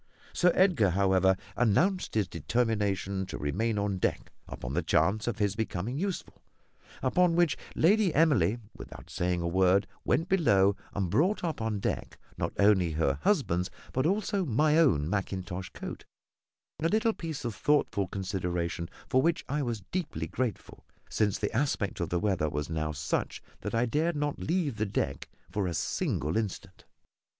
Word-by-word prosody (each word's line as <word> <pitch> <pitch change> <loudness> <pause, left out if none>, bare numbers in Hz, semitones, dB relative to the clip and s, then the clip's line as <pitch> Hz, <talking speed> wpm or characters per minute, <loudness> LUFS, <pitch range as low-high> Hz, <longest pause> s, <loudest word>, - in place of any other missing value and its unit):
Sir 180 0 +4
Edgar, 175 - +4
however, 95 0 +3 0.2
announced 165 - +2
his 105 -4 +2
determination 100 +1 -1
to - - -5
remain 105 +10 -1
on 100 -2 -1
deck, - - -1 0.2
upon 65 +1 -6
the 85 - +1
chance 85 +7 +1
of 120 - -1
his 105 -2 0
becoming 110 +4 -3
useful; 195 0 -4 0.6
upon 170 +6 +3
which, 175 -3 +3 0.2
Lady 200 +3 +4
Emily, 130 - +3 0.2
without - - -11
saying 90 0 0
a - - 0
word, 95 +3 +3 0.2
went 160 +7 +1
below 100 - +4 0.2
and 95 -4 -1
brought 180 - +2
up 165 -8 -2
on 110 -2 -1
deck - - -3 0.2
not - - -2
only 95 -5 +4
her 75 -3 0
husband's, 90 - +1 0.2
but 130 +4 +2
also 200 +1 0
my 150 +2 +2
own 75 - +3
mackintosh 95 -1 -3
coat - - -7 0.8
a 165 - +3
little 220 +3 +2
piece 160 -8 -6
of 115 - -2
thoughtful 100 -5 +1
consideration 90 -3 -3 0.2
for 130 - +3
which 165 +2 +1
I 145 +1 -1
was 115 -6 -3
deeply 165 - -2
grateful, 115 +7 -4 0.3
since 105 -3 +1
the 105 +2 -3
aspect 125 -6 0
of 85 - -2
the 85 - 0
weather 95 -7 0
was 75 +2 -3
now 80 -1 -1
such 75 0 -2 0.2
that - - -4
I 115 +2 +3
dared 155 +7 0
not 145 -1 -2
leave 160 - -1
the 110 -1 0
deck 70 -8 -2 0.2
for 100 -3 -1
a 85 - -2
single 80 +2 -1
instant. 100 -3 -4
105 Hz, 160 wpm, -29 LUFS, 90-150 Hz, 0.8 s, Sir